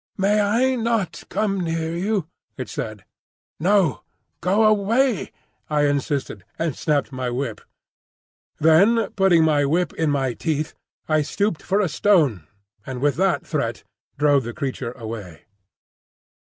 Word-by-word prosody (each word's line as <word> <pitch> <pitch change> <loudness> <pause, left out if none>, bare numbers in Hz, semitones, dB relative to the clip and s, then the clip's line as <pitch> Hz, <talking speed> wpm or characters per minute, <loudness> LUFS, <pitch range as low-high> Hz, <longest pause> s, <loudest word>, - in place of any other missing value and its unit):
"May 205 +2 +2
I 235 +6 +2
not 225 -5 -1
come 200 -2 0
near 165 -1 -2
you?" 190 -1 -1 0.3
it 130 - -5
said. 110 -3 -6 0.5
"No; 185 -3 +2 0.4
go 195 +5 +2
away," 215 +3 +2 0.4
I 150 -1 +2
insisted, 140 - -1
and 165 -4 -1
snapped 150 -2 0
my 130 -1 -3
whip. 120 -2 -3 1.0
Then 195 +9 +4
putting 190 -4 +4
my 150 -2 +3
whip 165 +6 +1
in 160 -2 0
my 135 -3 0
teeth, 155 +2 -2 0.3
I 155 -1 +3
stooped 185 +3 -1
for 195 +2 0
a 205 - +2
stone, 150 - +2 0.4
and 130 -2 -6
with 145 +1 +1
that 190 0 +1
threat - - -2 0.3
drove 145 -2 +3
the 120 +1 -6
creature 130 -4 -3
away. 110 - -8
160 Hz, 135 wpm, -22 LUFS, 140-195 Hz, 1.0 s, Then